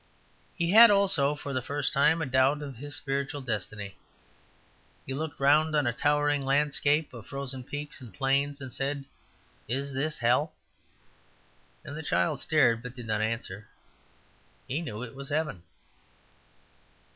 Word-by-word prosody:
He 170 Hz, -1 st, 0 dB
had 230 Hz, +3 st, +10 dB
(also 195 Hz, -8 st, +3 dB
for 140 Hz, -1 st, -6 dB
the 130 Hz, -, 0 dB
first 145 Hz, +3 st, -2 dB
time) 155 Hz, +3 st, +4 dB
a -, -, -1 dB
doubt 135 Hz, +3 st, +2 dB
of 135 Hz, -4 st, -7 dB
his 145 Hz, +3 st, -6 dB
spiritual 140 Hz, +1 st, -3 dB
destiny. 105 Hz, -4 st, -5 dB, 1.1 s
He 135 Hz, -, -4 dB
looked 155 Hz, +2 st, -4 dB
round 155 Hz, +3 st, +4 dB
on 150 Hz, -2 st, +3 dB
a 120 Hz, -, +1 dB
towering 145 Hz, +2 st, +1 dB
landscape 145 Hz, +2 st, +2 dB
of 115 Hz, -4 st, -10 dB
frozen 135 Hz, -2 st, -5 dB
peaks 145 Hz, +2 st, -7 dB
and 120 Hz, -4 st, -10 dB
plains, 140 Hz, +7 st, 0 dB
and 130 Hz, -2 st, -6 dB
said, 140 Hz, 0 st, -3 dB, 0.6 s
"Is 140 Hz, +4 st, -2 dB
this 150 Hz, +3 st, -1 dB
hell?" 125 Hz, +7 st, +2 dB, 1.3 s
And -, -, -9 dB
as 150 Hz, -, -6 dB
the -, -, -4 dB
child 90 Hz, 0 st, +1 dB
stared, 135 Hz, -8 st, +3 dB
but 125 Hz, +1 st, -8 dB
did 120 Hz, -2 st, -8 dB
not 110 Hz, -1 st, -1 dB
answer, 110 Hz, -2 st, -3 dB, 1.0 s
he 140 Hz, +5 st, -2 dB
knew 115 Hz, -8 st, -5 dB
it 120 Hz, -, -8 dB
was 135 Hz, +1 st, -8 dB
heaven. 150 Hz, -, -1 dB
140 Hz, 155 wpm, -28 LUFS, 125-150 Hz, 1.3 s, had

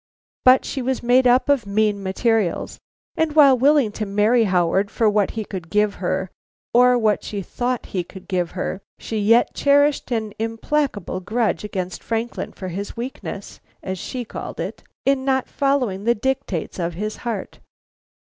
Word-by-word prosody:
But 255 Hz, +1 st, +6 dB
she 270 Hz, -, -3 dB
was 260 Hz, 0 st, -2 dB
made 250 Hz, +1 st, +4 dB
up 250 Hz, +1 st, +4 dB
of 275 Hz, -7 st, +2 dB
mean 205 Hz, 0 st, +1 dB
materials, 200 Hz, 0 st, 0 dB, 0.4 s
and 320 Hz, -2 st, 0 dB
while 280 Hz, -4 st, +7 dB
willing 270 Hz, -2 st, +3 dB
to 215 Hz, +1 st, -4 dB
marry 215 Hz, +4 st, +3 dB
Howard 190 Hz, +1 st, +2 dB
for 225 Hz, -, +1 dB
what 210 Hz, -1 st, +2 dB
he 220 Hz, -, -2 dB
could 180 Hz, -5 st, -7 dB
give 210 Hz, +1 st, +2 dB
her 185 Hz, 0 st, -1 dB, 0.4 s
or 250 Hz, +1 st, +6 dB
what 215 Hz, -3 st, +1 dB
she 200 Hz, -2 st, -4 dB
thought 245 Hz, +5 st, -2 dB
he 185 Hz, -2 st, 0 dB
could 190 Hz, +2 st, -13 dB
give 180 Hz, -3 st, -1 dB
her, 185 Hz, +1 st, -3 dB, 0.2 s
she 220 Hz, -, -4 dB
yet 230 Hz, +4 st, +4 dB
cherished 285 Hz, +1 st, +3 dB
an 220 Hz, -4 st, -2 dB
implacable 225 Hz, -, -1 dB
grudge 220 Hz, +4 st, -1 dB
against 185 Hz, -3 st, -4 dB
Franklin 230 Hz, +1 st, -3 dB
for 185 Hz, -, -7 dB
his 200 Hz, +6 st, -6 dB
weakness, 235 Hz, -4 st, -6 dB, 0.2 s
as 190 Hz, -1 st, -4 dB
she 250 Hz, +5 st, -5 dB
called -, -, -7 dB
it, -, -, -4 dB, 0.2 s
in 275 Hz, -1 st, +2 dB
not 265 Hz, -1 st, +1 dB
following 250 Hz, -9 st, 0 dB
the 235 Hz, +1 st, +3 dB
dictates 265 Hz, -, -2 dB
of 170 Hz, -1 st, -2 dB
his 215 Hz, +4 st, -4 dB
heart. 225 Hz, -5 st, -5 dB
220 Hz, 165 wpm, -22 LUFS, 195-255 Hz, 0.4 s, while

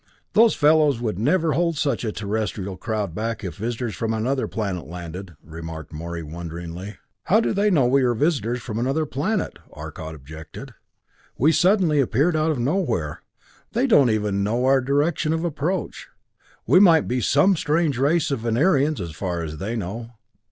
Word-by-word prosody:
"Those 225 Hz, 0 st, +5 dB
fellows 150 Hz, -3 st, +4 dB
would 110 Hz, -5 st, -3 dB
never 160 Hz, -, +2 dB
hold 170 Hz, -2 st, 0 dB
such 140 Hz, -5 st, 0 dB
a 110 Hz, -, -1 dB
Terrestrial 105 Hz, -2 st, -3 dB
crowd 105 Hz, -3 st, -3 dB
back 110 Hz, +3 st, -3 dB
if 95 Hz, -, -6 dB
visitors 115 Hz, +1 st, -3 dB
from 115 Hz, +2 st, -2 dB
another 130 Hz, +5 st, -1 dB
planet 100 Hz, -8 st, -4 dB
landed!" 90 Hz, +1 st, -8 dB
remarked 80 Hz, -1 st, -8 dB
Morey 85 Hz, +2 st, -5 dB
wonderingly. 85 Hz, +4 st, -7 dB, 0.3 s
"How 215 Hz, -, +4 dB
do 225 Hz, -, 0 dB
they 205 Hz, +1 st, +2 dB
know 150 Hz, -10 st, +3 dB
we 135 Hz, +3 st, +3 dB
are 120 Hz, -2 st, +2 dB
visitors 125 Hz, -4 st, 0 dB
from 110 Hz, -1 st, -4 dB
another 135 Hz, +6 st, 0 dB
planet?" 170 Hz, +10 st, -2 dB
Arcot 80 Hz, 0 st, -8 dB
objected. 80 Hz, +2 st, -10 dB, 0.6 s
"We 150 Hz, +6 st, +4 dB
suddenly 175 Hz, -4 st, +3 dB
appeared 140 Hz, +6 st, +2 dB
out 155 Hz, +1 st, +1 dB
of 155 Hz, -, 0 dB
nowhere 120 Hz, -, -1 dB, 0.5 s
they 240 Hz, +4 st, +2 dB
don't 145 Hz, -, +5 dB
even 105 Hz, -2 st, 0 dB
know 120 Hz, +5 st, 0 dB
our 135 Hz, 0 st, +4 dB
direction 145 Hz, +4 st, +1 dB
of 160 Hz, +1 st, -2 dB
approach. 165 Hz, +3 st, -3 dB, 0.6 s
We 180 Hz, -, +5 dB
might 170 Hz, -6 st, +5 dB
be 125 Hz, +1 st, -1 dB
some 145 Hz, -, +4 dB
strange 150 Hz, -3 st, 0 dB
race 145 Hz, +3 st, +2 dB
of 135 Hz, -, -1 dB
Venerians 140 Hz, +6 st, +2 dB
as 85 Hz, -3 st, -5 dB
far 85 Hz, +1 st, -3 dB
as 80 Hz, -1 st, -6 dB
they 105 Hz, +8 st, -3 dB
know." 115 Hz, +3 st, -5 dB
120 Hz, 170 wpm, -23 LUFS, 95-155 Hz, 0.6 s, Those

